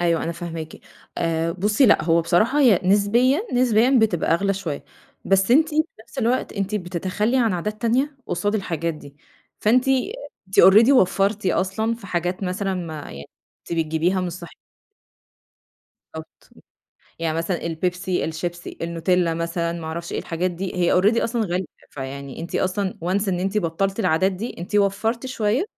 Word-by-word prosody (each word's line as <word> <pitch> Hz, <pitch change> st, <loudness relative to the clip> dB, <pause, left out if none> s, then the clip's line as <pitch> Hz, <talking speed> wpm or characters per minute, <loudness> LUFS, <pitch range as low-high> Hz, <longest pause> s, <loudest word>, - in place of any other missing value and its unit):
أيوه 170 Hz, -1 st, +1 dB
أنا 170 Hz, -, -2 dB
فهماكِ 165 Hz, -2 st, -7 dB, 0.4 s
آآ 165 Hz, 0 st, 0 dB
بُصّي 210 Hz, +8 st, +2 dB
لأ 210 Hz, -, +5 dB
هو 165 Hz, 0 st, +3 dB
بصراحة 215 Hz, -, +2 dB
هي 235 Hz, -10 st, +5 dB
نسبيًا، 230 Hz, -, +3 dB
نسبيًا 245 Hz, +1 st, +4 dB
بتبقى 190 Hz, -7 st, +2 dB
أغلى 195 Hz, +3 st, 0 dB
شوية 170 Hz, -7 st, -5 dB, 0.4 s
بس 195 Hz, +2 st, +2 dB
أنتِ 310 Hz, +6 st, +5 dB
في 310 Hz, 0 st, +2 dB, 0.2 s
نفس 235 Hz, +5 st, -13 dB
الوقت 245 Hz, +1 st, 0 dB
أنتِ 200 Hz, 0 st, -3 dB
بتتخلّي 190 Hz, +5 st, -1 dB
عن 230 Hz, -5 st, +2 dB
عادات 210 Hz, +5 st, -4 dB
تانية 265 Hz, +5 st, +1 dB
قصاد 205 Hz, +4 st, -1 dB
الحاجات 170 Hz, -5 st, -2 dB
دي، 145 Hz, -2 st, -13 dB, 0.4 s
فأنتِ 250 Hz, +5 st, +3 dB
أ -, -, +4 dB, 0.6 s
أنتِ 190 Hz, -, +4 dB
already 215 Hz, +6 st, +7 dB
وفّرتِ 200 Hz, -3 st, +2 dB
أصلًا 195 Hz, +5 st, 0 dB
في 230 Hz, -4 st, -12 dB
حاجات 180 Hz, +1 st, -2 dB
مثلًا 190 Hz, +1 st, -2 dB
ما 160 Hz, -5 st, -6 dB
يع 70 Hz, +1 st, -9 dB, 0.4 s
كنتِ -, -, -5 dB
بتجبيها 165 Hz, +4 st, +1 dB
مش 180 Hz, -1 st, -3 dB
صح 170 Hz, 0 st, -9 dB, 1.6 s
بالضبط، 160 Hz, 0 st, -11 dB, 0.7 s
يعني 165 Hz, -1 st, -1 dB
مثلًا 170 Hz, +1 st, -2 dB
البيبسي، 180 Hz, +2 st, -2 dB
الشيبسي، 170 Hz, +2 st, -5 dB
النوتيلّا، 170 Hz, +1 st, 0 dB
مثلًا 170 Hz, 0 st, -2 dB
ما 170 Hz, -1 st, -6 dB
اعرفش 170 Hz, +2 st, -5 dB
إيه -, -, -2 dB
الحاجات 175 Hz, +2 st, -2 dB
دي 180 Hz, +2 st, -5 dB
هي 175 Hz, -1 st, +2 dB
already 215 Hz, +5 st, +3 dB
أصلًا 235 Hz, 0 st, -1 dB
غالية 180 Hz, +1 st, -1 dB, 0.3 s
فيعني 135 Hz, 0 st, -7 dB
أنتِ 170 Hz, -, -4 dB
أصلًا 190 Hz, +1 st, -1 dB
once 195 Hz, +3 st, 0 dB
إن 180 Hz, -2 st, 0 dB
أنتِ 195 Hz, +3 st, 0 dB
بطّلتِ 195 Hz, +3 st, -1 dB
العادات 185 Hz, 0 st, +2 dB
دي 210 Hz, +6 st, -6 dB
أنتِ 180 Hz, +5 st, -7 dB
وفّرتِ 215 Hz, +5 st, 0 dB
شوية 240 Hz, -, 0 dB
185 Hz, 165 wpm, -22 LUFS, 170-215 Hz, 1.6 s, already